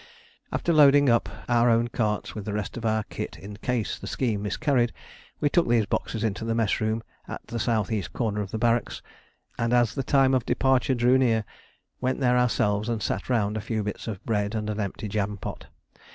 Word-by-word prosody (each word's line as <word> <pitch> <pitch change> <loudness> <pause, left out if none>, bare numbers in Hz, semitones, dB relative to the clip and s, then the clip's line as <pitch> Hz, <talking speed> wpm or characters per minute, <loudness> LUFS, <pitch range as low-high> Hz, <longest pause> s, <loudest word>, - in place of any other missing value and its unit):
After 170 - 0
loading 145 -2 +6
up 115 -5 +2 0.2
our 120 0 +4
own 115 +1 +3
carts 105 -3 -1
with 105 -2 -6
the 105 - -3
rest 105 -1 -3
of 115 -1 -3
our 110 0 +1
kit - - -6
in 100 +1 -9
case 120 -1 -2
the - - -8
scheme 115 -6 -1
miscarried, 120 +2 +1 0.5
we 150 - +2
took 165 -2 +2
these 115 -3 +3
boxes 110 +2 -2
into 110 0 -1
the 115 0 -1
mess 115 -3 +1
room 110 +1 -1 0.2
at - - -7
the 115 - -5
S.E. 110 -4 0
corner 105 -4 -1
of 100 - -5
the 110 - -3
barracks; 115 0 0 0.6
and 115 +1 +1
as 120 -2 +3
the 135 - -2
time 135 0 +3
of 130 -2 +2
departure 130 +1 +2
drew 125 +2 +4
near, 115 -4 +2 0.5
went 130 0 -1
there 125 -2 +3
ourselves 105 -3 +1
and 115 -3 -2
sat 100 - -2
round 110 -4 +1
a - - -3
few 110 0 -2
bits 105 +3 -5
of 105 -4 -6
bread 105 -1 -1
and 105 -1 -2
an 105 - -4
empty 105 +1 -3
jam 105 0 -2
pot. 90 - -7
115 Hz, 210 wpm, -26 LUFS, 105-125 Hz, 0.6 s, loading